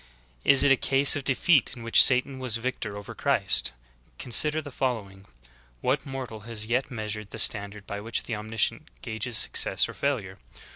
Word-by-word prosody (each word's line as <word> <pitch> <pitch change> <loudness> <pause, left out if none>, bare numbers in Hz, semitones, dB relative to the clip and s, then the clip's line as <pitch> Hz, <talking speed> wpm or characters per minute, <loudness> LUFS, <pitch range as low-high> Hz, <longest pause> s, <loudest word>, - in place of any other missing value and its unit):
Is 140 - +5
it 140 - +4
a 135 - +5
case 135 +2 +5
of 145 - -4
defeat 135 +1 +2
in 115 - -10
which 115 - +6
Satan 130 +1 +3
was 125 -3 -1
victor 115 -4 -5
over 100 - -9
Christ? - - 0 0.5
Consider 150 +6 +2
the 145 -2 -9
following. 100 -8 -4 0.5
What - - -1
mortal 130 -5 -7
has 110 0 -5
yet 125 +4 -1
measured 105 -3 -6
the - - -9
standard 100 -1 +2
by 100 0 -7
which 115 +2 -3
Omnisci 110 -1 -1
ence - - -15 0.2
gages 110 +1 -3
success - - +2
or - - -9
failure? 110 -10 -3
115 Hz, 175 wpm, -26 LUFS, 105-135 Hz, 0.5 s, which